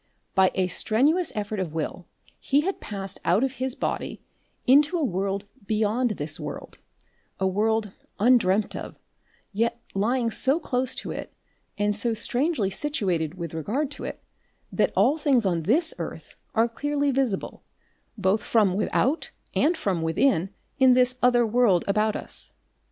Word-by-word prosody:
By 190 Hz, -1 st, +5 dB
a 190 Hz, -, +2 dB
strenuous 275 Hz, -, +2 dB
effort 210 Hz, 0 st, -3 dB
of 175 Hz, -5 st, -3 dB
will 165 Hz, +2 st, -4 dB, 0.3 s
he 280 Hz, +2 st, +2 dB
had 380 Hz, +5 st, -2 dB
passed 195 Hz, -2 st, -5 dB
out 180 Hz, +8 st, +3 dB
of 270 Hz, -, +1 dB
his 260 Hz, -1 st, 0 dB
body -, -, -3 dB, 0.5 s
into 295 Hz, +6 st, +5 dB
a 325 Hz, -, 0 dB
world 195 Hz, -3 st, -1 dB, 0.2 s
beyond 220 Hz, +3 st, +1 dB
this 145 Hz, +1 st, -3 dB
world, -, -, -7 dB, 0.6 s
a 190 Hz, -, +1 dB
world 210 Hz, +2 st, +1 dB, 0.3 s
undreamt 215 Hz, -3 st, +3 dB
of, -, -, -7 dB, 0.6 s
yet 230 Hz, +3 st, 0 dB
lying 230 Hz, +4 st, +1 dB
so 270 Hz, +7 st, +2 dB
close 255 Hz, -5 st, -1 dB
to -, -, -4 dB
it -, -, -6 dB, 0.5 s
and 205 Hz, 0 st, +1 dB
so 225 Hz, +2 st, 0 dB
strangely 245 Hz, -, 0 dB
situated 185 Hz, -, -2 dB
with 170 Hz, -3 st, -6 dB
regard 245 Hz, -, -2 dB
to -, -, -7 dB
it -, -, -6 dB, 0.5 s
that -, -, +1 dB
all 300 Hz, +4 st, +3 dB
things 270 Hz, -7 st, +3 dB
on 175 Hz, -3 st, +1 dB
this 300 Hz, -, +4 dB
earth -, -, -7 dB, 0.2 s
are 225 Hz, +1 st, +4 dB
clearly 285 Hz, +4 st, -1 dB
visible 255 Hz, -7 st, -1 dB, 0.5 s
both 195 Hz, +1 st, +1 dB
from 210 Hz, -5 st, +2 dB
without 245 Hz, -, 0 dB, 0.2 s
and 325 Hz, +3 st, +2 dB
from 185 Hz, -, -1 dB
within 165 Hz, +3 st, +2 dB, 0.3 s
in 260 Hz, -1 st, +6 dB
this 255 Hz, 0 st, +3 dB
other 245 Hz, -1 st, +4 dB
world 220 Hz, -6 st, +3 dB
about 210 Hz, +2 st, +1 dB
us. -, -, -4 dB
220 Hz, 150 wpm, -25 LUFS, 195-260 Hz, 0.6 s, in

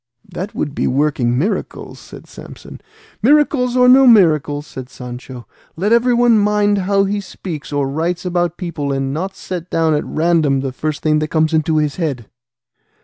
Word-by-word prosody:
"That 190 Hz, +4 st, -7 dB
would 145 Hz, -, -3 dB
be -, -, -1 dB
working 130 Hz, -3 st, 0 dB
miracles," 185 Hz, -, -3 dB
said -, -, -13 dB
Samson. -, -, -12 dB, 0.4 s
"Miracles 255 Hz, -1 st, +2 dB
or 250 Hz, 0 st, +5 dB
no 260 Hz, +1 st, +7 dB
miracles," 155 Hz, -, +3 dB
said 130 Hz, -4 st, -9 dB
Sancho, 125 Hz, -1 st, -9 dB, 0.3 s
"let 200 Hz, +7 st, 0 dB
everyone 240 Hz, -1 st, +3 dB
mind 205 Hz, 0 st, +2 dB
how 195 Hz, +1 st, +1 dB
he 200 Hz, +1 st, -2 dB
speaks 175 Hz, -6 st, -8 dB
or 145 Hz, -1 st, -1 dB
writes 165 Hz, +5 st, -3 dB
about 175 Hz, -1 st, -1 dB
people, 165 Hz, -6 st, -4 dB
and 135 Hz, 0 st, -2 dB
not 185 Hz, +6 st, -4 dB
set 180 Hz, -1 st, -7 dB
down 160 Hz, -1 st, +1 dB
at 150 Hz, -, 0 dB
random 155 Hz, -4 st, +1 dB
the 135 Hz, -1 st, -3 dB
first 150 Hz, +3 st, -4 dB
thing 155 Hz, -1 st, +2 dB
that 155 Hz, -, -2 dB
comes 155 Hz, +1 st, 0 dB
into 155 Hz, 0 st, +1 dB
his 150 Hz, -2 st, -1 dB
head." 145 Hz, -10 st, -3 dB
165 Hz, 170 wpm, -17 LUFS, 145-200 Hz, 0.4 s, no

